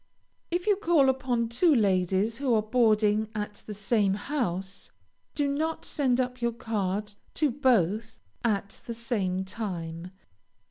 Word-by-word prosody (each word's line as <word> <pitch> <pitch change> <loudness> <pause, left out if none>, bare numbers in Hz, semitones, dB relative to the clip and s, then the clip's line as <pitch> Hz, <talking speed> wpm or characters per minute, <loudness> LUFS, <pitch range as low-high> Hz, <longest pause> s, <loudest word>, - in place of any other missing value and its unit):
If 350 +1 -1
you 415 -2 +3
call 335 -9 +4
upon 250 -3 0
two 300 +7 +4
ladies 195 +1 +1
who 265 -4 +2
are 215 - +2
boarding 215 -2 +2
at 210 -1 -4
the 210 - -5
same 205 -1 +1
house, 200 - -3 0.5
do 290 -1 +1
not 315 +3 -2
send 260 -4 +1
up 250 -1 -2
your 235 0 +1
card 210 -2 -2 0.2
to 300 -4 +2
both 225 - +1 0.3
at 200 -3 -1
the 235 - -4
same 195 -6 -1
time. 180 -4 -5
225 Hz, 140 wpm, -28 LUFS, 200-255 Hz, 0.5 s, call